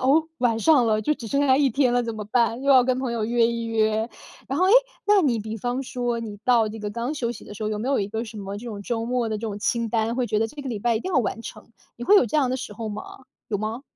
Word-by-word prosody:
哦， 315 +4 +4
晚 235 -3 +2
上 275 -2 +4
了， 215 -1 +1
就 300 - +2
只 235 -6 -6
剩 280 +5 +1
下 260 0 +5
1 280 - +4
天 255 0 +2
了 245 - +2
怎 230 -1 -4
么 210 -1 -5
办？ 235 +3 +1
又 280 - +2
要 255 -2 +7
跟 255 0 +1
朋 255 -3 -2
友 225 -2 -1
约 235 0 +3
一 235 0 -2
约。 220 0 +1 0.4
然 270 - -1
后， 370 - +4
哎， - - +4 0.4
那 415 -1 +5
你 260 -9 +1
比 220 +1 -5
方 245 +4 -2
说 245 -3 -2
你 210 -3 -7
到 235 -3 +4
这 220 +1 -7
个 210 0 -4
刚 235 +6 -3
休 250 -6 -2
息 225 - -11
的 - - -10
时 210 - -7
候， 215 - 0
有 215 -1 -2
没 225 - -4
有 275 - +2
一 200 - -2
个 225 +2 -3
什 215 -1 -9
么 200 0 -5
这 220 - -9
种 210 -3 -6
周 225 +2 -2
末 240 -1 -1
的 215 - -2
这 - - -8
种 215 -3 -4
清 230 +2 0
单， 225 0 0
会 250 - 0
觉 215 - 0
得 225 - +1
这 290 +6 -9
个 275 - -5
礼 215 - -3
拜 235 +2 +1
一 - - -2
定 370 - -4
要 290 - +4
完 230 -1 -2
成， - - -10 0.3
你 240 - -6
会 415 - +6
有 - - +6
这 235 - -1
样 265 -3 +2
的 255 - 0
时 260 +1 -6
候 225 -2 -5
吗？ 210 0 -5 0.5
有 205 - -1
吗？ 220 +5 -4
235 Hz, 335 characters per minute, -24 LUFS, 220-255 Hz, 0.5 s, 要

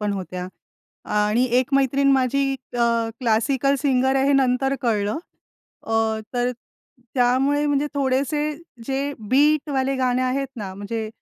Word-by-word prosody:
पण 210 -1 -1
होत्या 185 -2 -5 0.7
आणि 210 +4 +2 0.2
एक 260 +2 -3
मैत्रीण 275 +1 +3
माझी 265 +1 +2 0.4
अ, 235 - +4 0.4
क्लासिकल 250 +4 +1
सिंगर 265 -2 +2
आहे 270 +1 +2
हे 285 - +3
नंतर 270 0 +2
कळलं. 215 -1 0 0.7
अ, 225 - -3 0.4
तर 245 0 +1 0.6
त्यामुळे 265 +3 +2
म्हणजे 290 0 +1
थोडेसे 280 +2 0 0.4
जे 275 +1 -1 0.2
बीटवाले 275 -1 +2
गाणे 255 -1 +1
आहेत 265 +1 -1
ना, 200 -4 -5
म्हणजे 215 +3 -4
260 Hz, 130 wpm, -22 LUFS, 235-275 Hz, 0.7 s, अ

